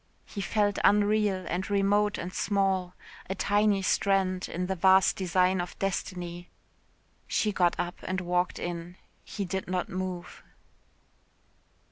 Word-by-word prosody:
He 200 - -6
felt 205 -1 +1
unreal 205 -2 +3
and 185 +3 -2
remote 205 +1 +2
and 180 +1 -5
small. 190 -3 0 0.3
A 190 - -2
tiny 205 0 +2
strand 190 -1 +1
in 180 +1 -2
the 190 - -1
vast 190 +1 +5
design 185 0 +2
of 175 - -7
destiny. 175 -2 -4 0.8
She 215 - +1
got 175 -3 +2
up 175 0 -3
and 185 0 -2
walked 180 0 0
in. 175 +1 -5 0.3
He 200 - -5
did 190 +1 -3
not 185 0 -2
move. 185 -1 -5
185 Hz, 130 wpm, -28 LUFS, 180-200 Hz, 0.8 s, vast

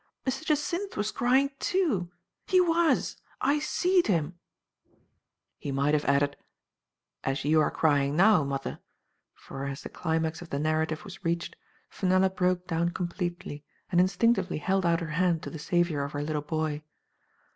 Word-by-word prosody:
] - - -50
Mr. 265 +3 -2
Jacynth 330 +6 -1
was 210 +1 0
crying, 265 +4 +2
too; 290 - 0 0.4
he 370 - +4
was; 340 -2 +2 0.2
/ 290 +2 +2
seed 360 +4 +2
kim'' 170 -5 0 1.3
He 140 - -4
might 140 +2 +1
have 150 -1 +1
added 140 0 +2 0.9
"as 135 0 -2
you 155 +1 +4
are 150 - +2
crying 145 -2 +2
now, 195 -1 +5
mother," 140 -1 -4 0.6
for 135 0 -7
as 140 +1 -5
the - - -6
climax 160 -1 -2
of 175 - -10
the 140 - -2
narrative 155 +2 0
was 195 -1 -10
reached, 170 0 -2 0.4
Fe 190 - -2
nella 185 +1 +4
broke 180 -1 0
down 170 -1 0
completely, 175 -3 -4 0.3
and 175 -1 +5
instinctively 230 +6 +2
held 190 +3 +1
out 170 0 +2
her 165 -2 -4
hand 175 -3 +2
to - - -6
the 160 - -7
savior 170 -2 +1
of 140 - -5
her 145 0 -2
little 150 0 -2
boy. 155 0 -2
170 Hz, 165 wpm, -28 LUFS, 150-205 Hz, 1.3 s, now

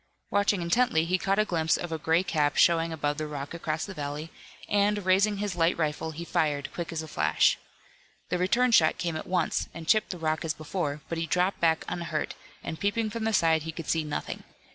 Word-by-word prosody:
Watching 205 -2 +2
intently 170 -3 +2
he 185 +2 +1
caught 195 +2 +1
a 215 - +3
glimpse 160 -4 +1
of 175 - -5
a 160 - -2
gray 165 +4 +2
cap 150 -5 +1
showing 165 -1 +4
above 150 -1 -2
the 155 - -2
rock 145 0 -6
across 160 -2 -2
the 195 - -7
valley, 150 0 -5 0.4
and, 205 -1 +1
raising 200 +2 +3
his 200 -2 -2
light 165 0 +2
rifle, 155 0 -1
he 165 +2 -6
fired, 145 -4 -1
quick 170 -2 -4
as 160 -1 -3
a - - -8
flash. - - +2 0.7
The 180 - 0
return 235 +7 +3
shot 160 -8 +5
came 170 -2 -2
at 155 - -5
once, 180 -3 0
and 165 -1 -8
chipped 215 +4 +3
the 180 - -5
rock 155 -1 -1
as 160 -1 -2
before, 150 -2 -3
but 165 - -3
he 165 - -2
dropped 180 +3 +1
back 160 -1 +2
unhurt, 170 -3 -3 0.3
and 160 - -5
peeping 215 +2 0
from 225 0 -3
the 225 - +1
side 165 -4 +3
he 160 +1 -5
could 160 -1 -8
see 165 -1 +1
nothing. 150 -1 -4
165 Hz, 220 wpm, -28 LUFS, 155-190 Hz, 0.7 s, shot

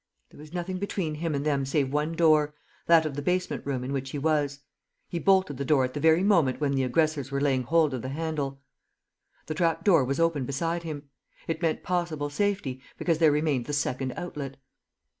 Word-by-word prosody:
There - - -16
was 150 +1 -12
nothing 180 +1 -3
between 190 -5 -2
him 155 0 -2
and 140 +1 -2
them 140 -3 +1
save 135 0 0
one 150 +2 0
door, 155 -3 +3 0.3
that 165 -1 +6
of 155 - -2
the 145 - -3
basement 180 +4 -1
room 130 -3 -1
in 135 +2 -3
which 135 -1 -3
he 145 - -4
was. 145 -1 0 0.5
He 170 - -3
bolted 190 -7 +3
the 140 - -2
door 140 -1 +3
at 130 - -6
the 145 - -3
very 160 +4 +4
moment 170 -11 +3
when 145 -2 +1
the 135 -1 +1
aggressors 140 +2 +1
were 140 0 -1
laying 135 -2 +2
hold 155 +3 +2
of 125 - -3
the 130 - -5
handle. 140 -2 -3 0.8
The 155 - -3
trap 165 0 0
door 170 -9 +5
was 135 +3 -2
open 165 -4 +2
beside 165 +6 -2
him; 145 -4 -7 0.4
it 160 0 -2
meant 165 -2 0
possible 170 -5 -2
safety, 170 -7 -1 0.2
because 165 -3 0
there 160 -2 +5
remained 145 -4 0
the 145 - -3
second 130 -2 -1
outlet. 145 -6 -6
150 Hz, 210 wpm, -27 LUFS, 140-165 Hz, 0.8 s, that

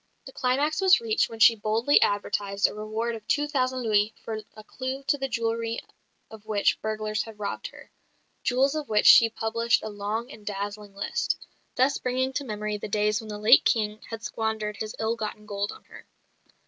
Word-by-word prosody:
The 265 - -9
climax 280 +6 0
was 380 -1 +6
reached 450 -2 +1
when 225 - -9
she 225 +2 +7
boldly 225 +6 +2
advertised 205 0 0
a - - +1
reward 215 +2 -3
of 220 -2 -9
two 295 0 +1
thousand 260 -3 -1
louis 215 -1 +2
for 220 -1 -4
a 215 - -11
clue 260 +4 -5
to 280 - +2
the 270 - -1
jewellery 230 -1 -2 0.5
of 220 -2 -11
which 210 -2 +1
burglars 215 0 -2
had 225 -2 -9
robbed 210 - -4
her - - -15 0.5
jewels 265 +3 +2
of 305 -2 -4
which 210 -1 +2
she 230 - +9
published 230 +1 0
a 220 - -4
long 210 +4 -4
and 215 - -12
dazzling 205 0 -5
list, 200 - -1 0.4
thus 265 +2 +2
bringing 260 +1 -1
to 285 - -2
memory 210 -3 -3
the - - -6
days 210 +1 +1
when 220 - -10
the 210 - -5
late 210 +1 +6
King 215 -1 0
had 225 -1 -7
squandered 220 -2 -3
his 215 0 -5
ill 225 +1 0
gotten 215 -1 -6
gold 205 -1 -3
on 435 - -13
her. - - -15
220 Hz, 195 wpm, -26 LUFS, 210-255 Hz, 0.5 s, she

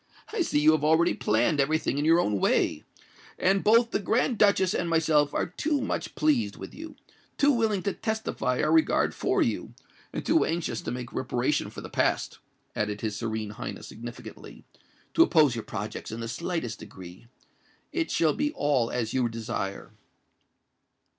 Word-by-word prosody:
"I 435 - 0
see 325 - +1
that 150 - +2
you 155 - +7
have 155 -2 +1
already 160 +3 +4
planned 120 +8 +1
every 150 +3 +3
thing 145 -2 -2
in 145 - 0
your 165 +2 +5
own 105 - +1
way; - - +1 0.5
and 195 +1 +2
both 230 +2 +4
the - - 0
Grand 230 +3 0
Duchess 200 -3 +4
and 175 - -1
myself 155 -3 +3
are - - 0
too 290 - -1
much 260 - -3
pleased 125 -10 +1
with - - -9
you—too 300 -2 -3
willing 220 -7 +1
to 200 - -1
testify 220 - -2
our - - +2
regard 320 -1 +3
for - - +1
you—and - - -6
too 325 - +4
anxious 160 -8 -2
to - - -4
make 125 -1 -6
reparation 130 +2 -1
for - - -9
the - - -7
past," - - 0 0.4
added 105 -1 -2
his 110 -2 -2
Serene 110 -2 -3
Highness 105 - -7
significantly, 120 +2 -10 0.5
"to - - +4
oppose 155 - +5
your 115 -2 -5
projects 105 +2 -5
in 110 - -6
the 115 - -4
slightest 165 -4 -3
degree. 90 +4 -12 0.6
It 335 -2 -1
shall 160 -3 +2
be 295 0 -1
all 135 -5 +1
as 115 -3 -2
you 125 -2 +1
desire." 115 -4 -5
150 Hz, 175 wpm, -27 LUFS, -, 0.6 s, you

